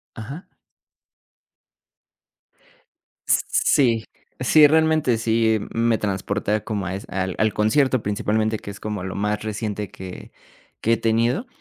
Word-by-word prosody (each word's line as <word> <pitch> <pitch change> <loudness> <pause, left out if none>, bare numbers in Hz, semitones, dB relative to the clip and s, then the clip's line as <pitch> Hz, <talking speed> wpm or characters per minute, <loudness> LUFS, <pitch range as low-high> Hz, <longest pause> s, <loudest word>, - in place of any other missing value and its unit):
Ajá. 135 - -8 2.8
Sí, 115 -6 +2 0.4
sí. 150 +4 +6
Realmente, 155 -5 +3
sí 110 -1 +2
me 115 -1 +1
transporta 105 +1 -1
como 100 -5 -3
a 95 - -3
es 100 - -7
al 95 -1 -2
al 110 0 +2
concierto, 130 +3 +2
principalmente, 110 +2 0
que 100 - -8
es 100 - -10
como 105 -3 -4
lo 95 - -5
más 105 +1 -1
reciente 105 -2 -4
que 95 -1 -10 0.5
que 115 +1 +3
he - - -2
tenido. 115 - +1
110 Hz, 125 wpm, -22 LUFS, 105-115 Hz, 2.8 s, sí